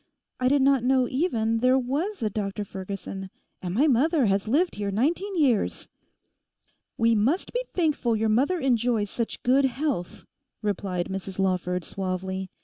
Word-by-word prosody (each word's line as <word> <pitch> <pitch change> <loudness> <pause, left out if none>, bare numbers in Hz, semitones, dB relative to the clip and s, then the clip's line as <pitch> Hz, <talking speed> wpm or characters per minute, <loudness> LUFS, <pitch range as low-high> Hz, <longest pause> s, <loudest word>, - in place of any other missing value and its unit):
I 255 - +2
did 275 +1 +3
not 270 -3 +4
know 255 0 +3
even 230 -7 0
there 255 +2 +4
was 285 - -2
a 215 - +1
Dr 205 0 -3
Ferguson; 190 0 -6 0.3
and 180 0 -4
my 275 +7 +4
mother 290 +1 +3
has 195 +1 +1
lived 320 +10 +2
here 205 -1 -3
nineteen 335 - 0
years.' 255 -9 +1 1.1
'We 230 0 +3
must 245 - +1
be - - 0
thankful 300 -9 +1
your 220 +1 +1
mother 270 +12 +2
enjoys 235 -6 +1
such 230 -2 -4
good 265 +3 +4
health,' 265 - -2 0.4
replied 190 -3 -1
Mrs 190 0 -5
Lawford 180 -2 0
suavely. 190 0 -4
230 Hz, 150 wpm, -26 LUFS, 195-275 Hz, 1.1 s, not